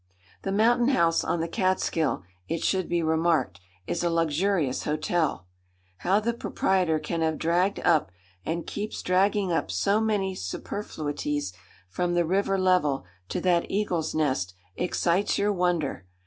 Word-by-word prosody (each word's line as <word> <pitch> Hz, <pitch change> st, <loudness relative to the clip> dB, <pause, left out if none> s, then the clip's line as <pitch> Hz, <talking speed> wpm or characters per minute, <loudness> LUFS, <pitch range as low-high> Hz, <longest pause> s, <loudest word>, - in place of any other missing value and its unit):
The 195 Hz, -, -3 dB
Mountain 235 Hz, +4 st, +3 dB
House 170 Hz, -12 st, +3 dB
on 170 Hz, -, 0 dB
the 165 Hz, -, -1 dB
Catskill, 185 Hz, -, 0 dB, 0.2 s
it 165 Hz, 0 st, -2 dB
should 185 Hz, -2 st, +1 dB
be 170 Hz, -1 st, +1 dB
remarked, 160 Hz, -, +1 dB, 0.3 s
is 175 Hz, -, -2 dB
a 175 Hz, -, +2 dB
luxurious 165 Hz, -2 st, +1 dB
hotel. 155 Hz, -, 0 dB, 0.5 s
How 190 Hz, +3 st, +2 dB
the 235 Hz, +2 st, -1 dB
proprietor 185 Hz, -7 st, +1 dB
can 160 Hz, +2 st, -3 dB
have 160 Hz, -1 st, +1 dB
dragged 175 Hz, +4 st, +1 dB
up, 160 Hz, -, +3 dB, 0.3 s
and 170 Hz, -, -3 dB
keeps 210 Hz, +1 st, -5 dB
dragging 195 Hz, +1 st, +2 dB
up, 165 Hz, -, 0 dB
so 200 Hz, -, +1 dB
many 205 Hz, -3 st, 0 dB
superfluities 145 Hz, -, -4 dB, 0.3 s
from 175 Hz, -, -1 dB
the 175 Hz, -1 st, +3 dB
river 195 Hz, +3 st, +1 dB
level 180 Hz, -, +2 dB, 0.2 s
to -, -, -1 dB
that 175 Hz, -2 st, +2 dB
eagle's 175 Hz, -6 st, -1 dB
nest, 130 Hz, -, 0 dB, 0.2 s
excites 180 Hz, +2 st, +1 dB
your 205 Hz, +1 st, +2 dB
wonder. 175 Hz, -, -1 dB
175 Hz, 145 wpm, -27 LUFS, 155-195 Hz, 0.5 s, Mountain